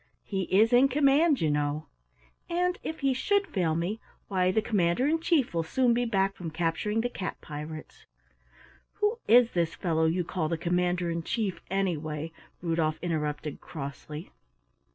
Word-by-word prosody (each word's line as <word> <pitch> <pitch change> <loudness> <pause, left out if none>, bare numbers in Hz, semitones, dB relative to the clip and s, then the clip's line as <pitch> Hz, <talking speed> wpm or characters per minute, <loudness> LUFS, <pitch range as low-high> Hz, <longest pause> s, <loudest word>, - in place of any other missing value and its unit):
He 190 -2 -2
is 215 +7 +4
in 250 +3 +7
command, 285 +2 +3
you 155 -2 +2
know. 145 +1 -1 0.6
And 360 +1 0
if 320 0 -5
he 275 -1 +3
should 400 +10 +1
fail 175 - 0
me, 180 +7 -2 0.3
why 185 -2 +2
the 220 - +2
Commander 200 +1 +1
in 325 +2 +2
Chief 320 - +1
will 165 - +1
soon 240 +9 +2
be 245 +1 +1
back 195 -3 +1
from 170 -2 -5
capturing 175 +7 -1
the 245 - 0
cat 195 -6 -5
pirates." 155 +1 -8 0.9
"Who 420 +3 0
is 240 0 +6
this 170 -2 0
fellow 160 -2 +1
you 175 +3 +1
call 165 -2 -2
the 165 - -1
Commander 175 +1 0
in 165 0 -2
Chief, 205 +1 -2
anyway?" 165 -5 -2 0.3
Rudolf 165 -2 0
interrupted 150 -3 -2
crossly. 150 +2 -7
180 Hz, 160 wpm, -28 LUFS, 160-245 Hz, 0.9 s, in